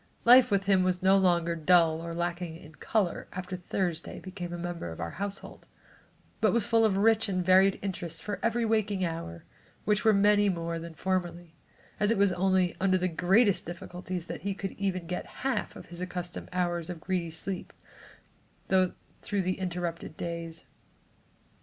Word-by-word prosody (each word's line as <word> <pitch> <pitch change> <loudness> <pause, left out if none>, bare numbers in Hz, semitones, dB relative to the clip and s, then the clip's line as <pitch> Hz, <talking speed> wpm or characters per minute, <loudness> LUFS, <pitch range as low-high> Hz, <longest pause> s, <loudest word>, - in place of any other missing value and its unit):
Life 250 +1 +8
with 200 -2 +2
him 195 -1 +3
was 185 0 0
no 190 +1 +6
longer 175 -3 +3
dull 165 0 +4
or 170 0 -5
lacking 175 -1 -3
in 155 -1 -14
color 190 +1 -1
after 185 0 -5
Thursday 180 -2 -3
became 185 -2 -7
a 175 - -4
member 175 - -4
of 80 - -9
our 85 -1 -3
household, 200 0 -6 0.7
but - - +3
was 235 -3 +2
full 225 0 +3
of 205 -3 +3
rich 220 +1 +3
and 185 -2 -1
varied 190 +1 +5
interests 175 -4 -4
for 205 -1 -4
every 230 0 +1
waking 215 -4 +1
hour, 165 - -5 0.4
which 210 0 +2
were 220 - +6
many 205 0 +4
more 170 -2 -2
than 165 0 -9
formerly, 175 -2 -2 0.5
as 210 - +2
it 230 - +2
was 200 -1 +4
only 185 -1 +2
under 190 -1 +3
the 185 0 0
greatest 190 +5 +3
difficulties 180 0 -6
that - - -6
he 200 0 -2
could 195 -1 -5
get - - -22
even 185 -3 -1
half 240 +6 -3
of - - -10
his 175 +1 -8
accustomed 180 -1 -5
hours 175 -2 -1
of 175 -2 -5
greedy 175 0 -2
sleep 175 +3 -5 1.0
through 190 +2 -1
the 185 +2 -1
interrupted 175 -3 -4
days. 165 -1 -5
185 Hz, 170 wpm, -29 LUFS, 170-200 Hz, 1.0 s, Life